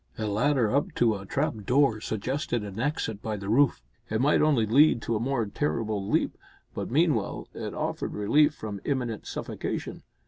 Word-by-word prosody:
A 110 - -2
ladder 120 +3 +2
up 155 +4 0
to 115 -2 +3
a 100 -1 -7
trap 140 +7 0
door 125 -4 +3
suggested 120 +2 -2
an 100 0 -7
exit 115 -6 -2
by 110 -1 -3
the 100 0 -6
roof. 130 - +3 0.3
It 110 - 0
might 145 +4 +3
only 145 -7 +3
lead 135 +5 +5
to 115 - -1
a - - 0
more 120 -1 0
terrible 105 -3 -2
leap, - - 0 0.3
but - - -4
meanwhile - - +1
it - - -5
offered - - -3
relief 145 +9 +3
from 105 -3 -6
imminent 125 -6 -2
suffocation. - - -4
115 Hz, 175 wpm, -27 LUFS, 105-140 Hz, 0.3 s, lead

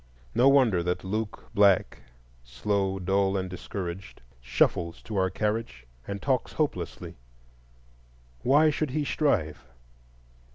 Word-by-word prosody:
No 130 +3 +5
wonder 125 -10 +4
that 90 +1 -2
Luke 105 +3 -4
Black, 100 -2 +3 0.4
slow, 95 +11 -1
dull, 95 +1 +1
and 95 -1 -2
discouraged, 95 -1 -7 0.2
shuffles 85 +7 0
to 110 - -7
our 95 -1 +2
carriage 105 - -3 0.2
and 100 0 -4
talks 130 0 -1
hopelessly. 115 - -3 1.2
Why 150 +4 +4
should 150 0 -2
he 145 +3 -1
strive? 80 - 0
100 Hz, 115 wpm, -27 LUFS, 90-120 Hz, 1.2 s, No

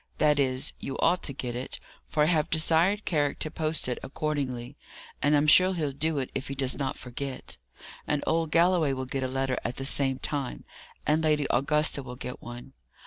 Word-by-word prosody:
That 150 -1 +3
is, 130 0 0
you 135 - -5
ought 180 - +3
to - - -2
get 125 -3 -4
it; 125 +2 -5 0.3
for 150 - +2
I - - +5
have 155 -2 +2
desired 170 +6 +2
Carrick 145 -4 +1
to 155 - -3
post 155 -2 -1
it 125 - -2
accordingly, 135 -3 -3 0.5
and 145 +1 +4
I'm 145 - +3
sure 185 +5 +6
he'll 150 -4 -1
do 150 +3 -1
it 130 -2 -2
if 135 0 -4
he 135 - -4
does 130 -1 +1
not 135 -2 -2
forget. 130 - -6 0.5
And 150 -1 0
old 165 -1 +1
Galloway 170 -3 +3
will 130 0 -3
get 135 +1 -3
a 130 - 0
letter 135 0 -1
at 120 - -3
the 135 - -4
same 135 -1 +3
time, 135 - -4 0.4
and 155 +1 +2
Lady 150 -2 +2
Augusta 150 +3 +2
will 125 -2 -8
get 125 0 -7
one. 120 +2 -9
140 Hz, 200 wpm, -28 LUFS, 130-155 Hz, 0.5 s, sure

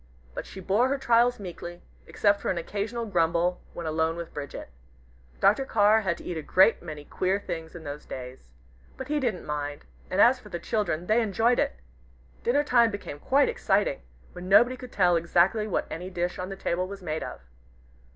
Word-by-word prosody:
But - - -6
she 195 - -9
bore 205 +7 +2
her 280 - +1
trials 240 -1 +3
meekly, 175 -2 -8 0.2
except 205 -1 +2
for - - -2
an 185 - 0
occasional 210 +7 -3
grumble 175 -2 +1
when 170 - -5
alone 160 +1 0
with 170 -1 -7
Bridget. 140 - -7 0.7
Dr. 270 - +4
Carr 215 -3 +4
had 185 -5 -1
to - - -12
eat 175 - -4
a - - -3
great 190 +8 +4
many 155 -3 -8
queer 190 +5 0
things 165 -4 -6
in 170 - -9
those 145 0 -7
days. 125 - -8 0.5
But 265 - -7
he 300 0 +1
didn't 235 -9 -2
mind, 145 -1 -4 0.2
and 185 - -1
as 250 +4 +6
for - - -14
the 175 - -4
children, 175 -3 -2
they 220 +5 +3
enjoyed 225 +3 +2
it. - - 0 0.7
Dinner 280 +5 +2
time 240 -5 +4
became 200 -9 -7
quite 275 - +3
exciting, - - +1 0.3
when 180 +1 -8
nobody 240 +6 +6
could 250 -1 -10
tell 180 -3 +3
exactly 175 +6 +2
what 200 - -1
any 180 +3 -5
dish 175 -1 -3
on 185 +1 -4
the 195 - -5
table 180 -1 -1
was 200 0 -9
made 155 -2 -3
of. - - -7
185 Hz, 195 wpm, -27 LUFS, 170-230 Hz, 0.7 s, as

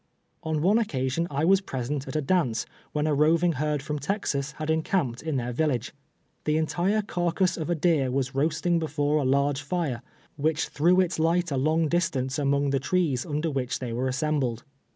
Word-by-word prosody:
On 155 -1 -1
one 205 +6 +4
occasion 145 - -1
I 145 +2 0
was 190 +2 +5
present 135 -3 -4
at - - -6
a 155 - 0
dance, 135 -7 +1 0.3
when 150 0 -1
a 155 - +2
roving 165 +4 +3
herd 150 -1 -1
from 150 -1 -3
Texas 140 -5 -2
had 155 +1 -2
encamped 160 -6 0
in 160 -2 -2
their 125 -1 -1
village. 130 -3 -1 0.5
Tlie 150 0 +2
entire 180 +7 +1
carcass 180 -1 0
of 160 -1 -4
a 175 - +2
deer 155 -5 +2
was 135 +1 -1
roasting 160 +5 +1
before 150 -2 0
a 150 - +1
large 140 +1 +1
fire, 145 -5 -2 0.4
wdiicli 155 +1 +1
threw 175 +5 +3
its 180 -2 -1
light 170 +1 +2
a - - 0
long 155 +4 +2
dis 175 +3 +1
tance 130 +1 -2
among 140 0 +1
the 135 - +1
trees 140 -4 0
under 155 +2 -1
which 130 -3 -2
they 125 -3 -5
were 125 +3 -1
assem 150 +3 0
bled. 120 -3 -2
150 Hz, 195 wpm, -26 LUFS, 135-170 Hz, 0.5 s, was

